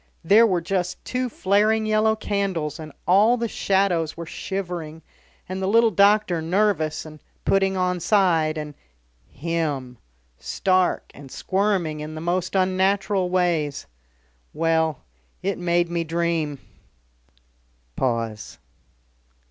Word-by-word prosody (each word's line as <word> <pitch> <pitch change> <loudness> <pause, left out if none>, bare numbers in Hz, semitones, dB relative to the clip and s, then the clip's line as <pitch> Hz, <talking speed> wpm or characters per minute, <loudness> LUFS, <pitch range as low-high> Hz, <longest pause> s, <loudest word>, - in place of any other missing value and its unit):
There 215 +7 +6
were 180 -4 0
just 180 +1 -2
two 255 0 -2
flaring 215 +2 +2
yellow 215 0 +2
candles, 190 -8 -2
and 155 -1 -8 0.2
all 210 +7 +5
the 235 0 -1
shadows 190 -7 0
were 170 - -6
shivering, 170 -3 -5 0.4
and 185 +1 -4
the 190 - -1
little 230 +2 +4
doctor 200 -3 +3
nervous 165 -3 0
and 155 -1 -11 0.3
putting 195 -1 +2
on 180 -1 0
side, 165 -5 +2
and 150 -1 -5 0.5
him 145 -6 -3 0.4
stark 185 -1 0
and 140 -1 -12
squirming 190 -6 -1
in 155 +1 -6
the - - -5
most 175 +3 -2
unnatural 190 0 +1
ways. 170 -6 0 0.7
Well, 160 -1 +1 0.4
it 195 0 -1
made 175 0 +1
me 170 0 -2
dream." 165 -3 -1 1.4
Pause. 115 -4 -2
180 Hz, 115 wpm, -23 LUFS, 160-195 Hz, 1.4 s, There